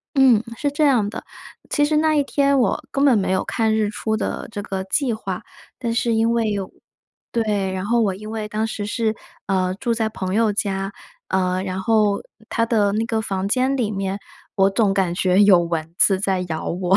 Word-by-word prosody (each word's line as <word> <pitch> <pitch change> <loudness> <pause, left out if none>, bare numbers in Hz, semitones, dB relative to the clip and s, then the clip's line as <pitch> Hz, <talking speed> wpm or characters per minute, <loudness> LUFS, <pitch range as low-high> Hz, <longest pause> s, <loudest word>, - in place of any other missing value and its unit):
嗯， 255 -5 +5
是 285 - -1
这 290 +2 +1
样 245 -8 +3
的， - - -7 0.5
其 290 - +2
实 300 +1 +1
那 310 0 +3
一 290 - +2
天 280 0 +2
我 245 - +1
根 275 +1 +1
本 270 -5 +5
没 190 - -1
有 190 0 +1
看 220 -1 0
日 215 -1 +1
出 220 +1 -2
的 - - -3
这 205 -2 -5
个 195 -2 -4
计 250 +6 0
划。 195 -4 -4 0.4
但 235 -3 -2
是 235 0 +1
因 225 +1 +2
为 230 -2 +1
有 200 -2 -3 0.6
对， 210 -4 0
然 190 0 -3
后 235 +2 +2
我 200 -4 +1
因 215 +3 -8
为 220 -1 -4
当 215 +1 -1
时 210 -2 -4
是， 220 0 0 0.3
呃， 185 -1 0
住 235 +4 -2
在 220 -1 0
朋 190 -3 -4
友 220 -1 +3
家， 195 -1 -2 0.4
呃， 185 0 0
然 190 0 -3
后 210 -1 +2 0.3
她 230 - +1
的 210 -4 +2
那 215 +2 0
个 225 -2 0
房 195 -3 -2
间 260 +6 +1
里 235 -5 0
面， 195 -1 -2 0.4
我 195 0 +4
总 200 0 +2
感 190 -3 0
觉 185 +1 +2
有 195 -4 +7
蚊 165 -1 -3
子 195 -2 +5
在 190 -1 0
咬 160 -1 -3
我， 180 +2 +2
210 Hz, 225 characters per minute, -21 LUFS, 190-230 Hz, 0.6 s, 有